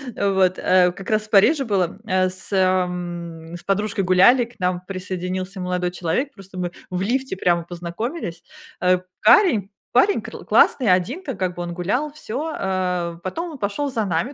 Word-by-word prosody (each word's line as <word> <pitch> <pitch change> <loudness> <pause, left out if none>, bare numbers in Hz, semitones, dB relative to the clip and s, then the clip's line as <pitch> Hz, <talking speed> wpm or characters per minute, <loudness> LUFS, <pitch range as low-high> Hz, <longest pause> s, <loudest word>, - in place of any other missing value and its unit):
вот, 190 -2 +2
э 180 -1 +4
Как 190 +2 -9
раз 215 0 +2
в 215 - -13
Париже 245 +9 +5
было, 195 -5 -1
э, 185 -2 +2
с 185 +2 -9
м 175 -3 -1
С 175 - -10
подружкой 200 +1 0
гуляли, 190 +8 +5
к 230 -2 -20
нам 180 -1 0
присоединился 185 0 -4
молодой 180 0 -1
человек. 180 - -2
Просто 195 -3 -12
мы 175 -1 -2 0.2
в 180 0 -3
лифте 250 +1 -1
прямо 175 -2 +2
познакомились. 175 - -5 0.4
Э, 180 0 +4 0.2
парень 220 - +5 0.2
парень 380 +12 +4
кр - - -9
классный, 250 -5 +4
один 220 - +1
ка 270 -7 -4
как 185 -2 -2
бы 175 - -5
он 175 0 -4
гулял, 250 - -1
всё. 305 +1 -4
Э, 180 -3 -1
потом 330 - -4
он 300 - -8
пошёл 270 +8 -2
за 225 -4 -1
нами, 190 - -1
185 Hz, 175 wpm, -22 LUFS, 180-225 Hz, 0.4 s, Париже